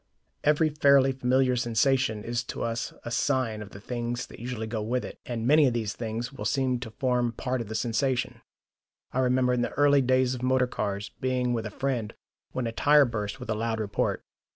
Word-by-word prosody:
Every 150 +1 +3
fairly 140 -2 +5
familiar 130 0 +2
sensation 120 -1 +1
is 120 +1 -2
to - - -5
us 115 0 -2
a 120 - -4
sign 125 -5 0
of 105 - -8
the 100 - -11
things 120 +2 -3
that - - -13
usually 120 -1 -4
go 110 0 -3
with 120 +4 -1
it, - - -9
and 115 -2 -3
many 150 +2 +6
of 120 - 0
these 110 -3 -1
things 115 +2 -4
will - - -7
seem 130 -3 +1
to 120 -2 -6
form 125 +1 0
part 130 +1 -2
of 115 - -6
the 110 - -5
sensation. 125 +3 -1 0.7
I 130 - -1
remember 125 0 +2
in 125 - +1
the - - 0
early 145 -1 +4
days 130 0 +2
of 125 - -6
motor 130 0 +3
cars 100 -4 -3
being 125 -1 0
with 115 -2 -2
a - - -6
friend 120 -2 -2 0.4
when 130 - -2
a 115 - -2
tyre 145 +4 +5
burst 105 -4 -4
with 110 - -5
a - - +2
loud 110 +1 -2
report. 105 -2 -1
125 Hz, 210 wpm, -27 LUFS, 115-130 Hz, 0.7 s, many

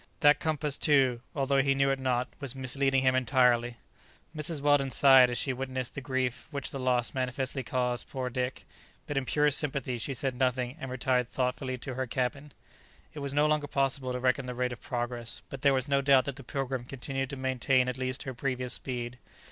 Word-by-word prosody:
That 145 0 +6
compass, 150 -2 -1
too, 130 -5 +3
although 135 -1 +2
he 135 0 +2
knew 135 0 +3
it 135 - -1
not, 125 -1 0
was 135 -2 -2
misleading 135 +1 +1
him 130 -1 +4
entirely! 125 -2 +2 0.6
Mrs. 155 0 -2
Weldon 145 -1 +3
sighed 130 -2 +7
as 120 - -2
she 135 +2 +1
witnessed 130 -1 -4
the 140 - -5
grief 130 -2 -2
which 140 -3 -4
the 135 - -5
loss 125 -2 +1
manifestly 130 +1 -2
caused 125 -1 -2
poor 130 -2 -3
Dick, 125 +1 -3 0.4
but 145 - -5
in 135 -1 0
purest 150 +1 +3
sympathy 135 -4 -2
she 135 +4 -2
said 130 +3 -1
nothing, 125 0 0
and 135 - -6
retired 125 -1 0
thoughtfully 130 0 -2
to 130 +1 -6
her 130 +1 -3
cabin. 140 +4 -2 0.6
It 150 - -7
was 140 -1 -3
no 150 +1 +4
longer 150 -1 +1
possible 135 -2 0
to 125 - -2
reckon 130 +1 +1
the 125 - -5
rate 125 0 -1
of 120 - -11
progress, 120 -1 -4
but 135 - -7
there 140 - +5
was 130 0 0
no 140 -1 +2
doubt 135 -2 +5
that 140 - -4
the 140 - -11
"Pilgrim" 130 -1 -3
continued 135 +1 -4
to 140 - -5
maintain 130 -1 +1
at 125 +1 -3
least 130 0 -2
her 130 - -5
previous 125 0 -3
speed. 125 -1 -5
130 Hz, 205 wpm, -29 LUFS, 125-140 Hz, 0.6 s, sighed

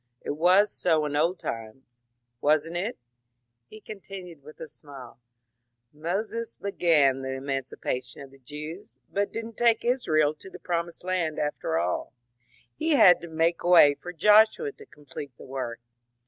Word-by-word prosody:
It - - -4
was 180 +7 +4
so 160 -4 +1
in 145 -1 -3
old 165 +5 +1
times 115 0 -6 0.3
— 120 0 -53
wasn't 155 +3 +2
it?" 200 +7 -3 0.7
he 215 - -12
continued, 195 -6 -10
with 150 +2 -14
a 160 - -7
smile. 135 -6 -12 0.8
^ - - -22
Moses 215 +7 -3
began 155 -9 +2
the 130 0 -4
emancipation 135 -1 -4
of 135 - -13
the 135 - -18
Jews, 150 -1 -9 0.2
but 200 0 -1
did 225 0 -5
n't 230 -1 -11
take 235 -1 +3
Israel 155 - +2
to 155 - -12
the - - -10
Pro 170 -1 -1
mised 170 0 -12
Land 180 -4 -1
after 150 - -2
alL 90 +7 -2 0.6
He 320 0 0
had 180 -10 +7
to 170 - -8
make 165 +1 0
way 170 -5 +7
for 175 +5 -9
Joshua 215 - +4
to 435 +1 -15
com 150 - -20
plete 140 -2 -8
the - - -12
work. 130 -3 -5
160 Hz, 170 wpm, -26 LUFS, 135-190 Hz, 0.8 s, had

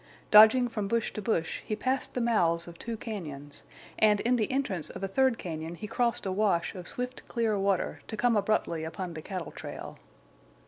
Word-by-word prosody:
Dodging 220 +4 +8
from 210 -4 -3
bush 230 +2 0
to 215 - -4
bush, 180 -6 -1
he 215 - -2
passed 260 +4 -1
the 250 - 0
mouths 175 -8 +2
of 170 -1 -11
two 230 -1 -4
cañons, 145 - -7 0.4
and 210 -1 +5
in 245 +2 +2
the 220 -1 0
entrance 200 - -1
of - - -8
a - - 0
third 260 +4 +2
cañon 165 0 -5
he 215 - -6
crossed 235 +1 0
a 190 - -1
wash 190 -3 +1
of 180 -2 -8
swift 250 +1 -4
clear 230 -3 0
water, 195 -2 0
to 220 - -6
come 240 0 +3
abruptly 200 -6 0
upon 175 +2 -5
the 160 - -6
cattle 185 -2 -5
trail. - - -8
210 Hz, 195 wpm, -29 LUFS, 170-230 Hz, 0.4 s, Dodging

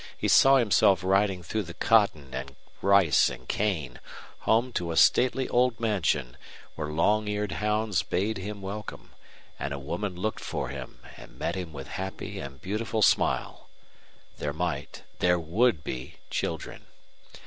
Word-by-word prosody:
He - - -1
saw 135 0 +7
himself 100 -6 +4
riding 95 -1 +2
through 110 +7 -2
the 85 -3 -9
cotton 80 -12 +2
and 70 0 -6 0.3
rice 100 -5 +5
and - - -10
cane, 80 -12 -1 0.4
home 120 +3 +1
to 85 -1 -2
a 80 - -3
stately 130 +1 +4
old 125 -2 +2
mansion, 80 - 0 0.4
where 75 - -4
long 105 +8 +1
eared 105 -2 -2
hounds 105 +1 0
bayed 100 +4 -1
him 100 +1 -6
welcome, 105 +2 -7 0.5
and 70 - -3
a - - -6
woman 85 +8 -4
looked 110 +5 -3
for 65 - -3
him 65 -2 -8 0.2
and - - -14
met - - -2
him 90 -3 -5
with 70 -3 -8
happy 95 +1 -5
and 70 0 -9
beautiful 110 +2 -1
smile. - - +1 0.7
There 75 -1 -2
might 80 -3 -4 0.2
there 90 0 +3
would 85 - +1
be 65 +1 -6 0.2
children. - - -4
95 Hz, 150 wpm, -27 LUFS, 75-105 Hz, 0.7 s, saw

